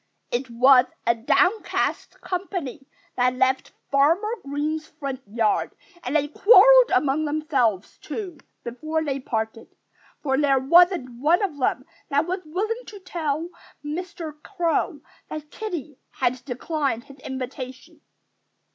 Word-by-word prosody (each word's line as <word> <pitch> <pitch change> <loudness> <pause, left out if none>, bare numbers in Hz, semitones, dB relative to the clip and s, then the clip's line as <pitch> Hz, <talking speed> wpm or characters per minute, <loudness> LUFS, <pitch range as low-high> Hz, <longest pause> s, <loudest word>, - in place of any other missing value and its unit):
It 250 +2 -2
was 250 +2 +6 0.2
a 235 - +4
downcast 365 - 0
company 355 -8 -4 0.3
that 250 0 +2
left 260 +1 +1 0.2
Farmer 330 +11 +3
Green's 300 +3 -3
front 275 -4 -6
yard. 215 0 0 0.3
And 255 - -3
they 290 -1 +2
quarreled 480 +9 +7
among 295 +2 +2
themselves, 275 - 0
too, 365 -8 -6 0.2
before 310 +7 -3
they 275 -3 -2
parted. 225 -2 -4 0.5
For 265 -2 +1
there 280 -2 +3
wasn't 275 -3 +4
one 340 +7 +3
of 320 -8 -3
them 255 0 0 0.2
that 285 +2 +2
was 365 +3 -2
willing 430 +9 -2
to 415 - -10
tell 330 -3 -3 0.4
Mr. 315 -1 -6
Crow 345 -4 -1 0.3
that 305 -1 -7
Kiddie 335 -10 -6
had 250 0 -1
declined 275 -1 -2
his 275 +1 -15
invitation. 265 +4 -7
290 Hz, 125 wpm, -24 LUFS, 260-340 Hz, 0.5 s, quarreled